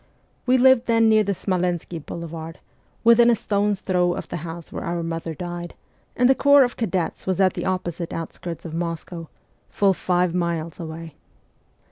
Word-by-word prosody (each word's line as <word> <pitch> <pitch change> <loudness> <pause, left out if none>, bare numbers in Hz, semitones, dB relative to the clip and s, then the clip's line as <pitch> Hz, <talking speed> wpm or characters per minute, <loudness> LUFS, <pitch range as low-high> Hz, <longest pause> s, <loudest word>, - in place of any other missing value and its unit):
We 255 +1 +5
lived 260 -1 +5
then 230 -1 +4
near 215 -1 +5
the 200 -1 -1
Smolensky 180 -2 -2
boulevard, 165 +1 -7 0.5
within 235 +1 +6
a 235 - +5
stone's 205 -2 0
throw 180 -2 +1
of - - -7
the - - -3
house 165 0 -8
where - - -5
our 170 0 -2
mother 165 -1 -4
died, 175 +1 -6 0.4
and 245 - +4
the 265 - +6
corps 285 +1 +6
of 245 - -2
cadets 190 -7 -2
was 185 -1 0
at 190 -2 +4
the - - -4
opposite 175 -2 -3
out 165 -1 -5
skirts 170 -1 -7
of 160 - -6
Moscow, 165 0 -4 0.4
full 195 -1 +2
five 180 -1 0
miles 170 -2 -2
away. 165 -1 -7
175 Hz, 175 wpm, -23 LUFS, 165-205 Hz, 0.5 s, within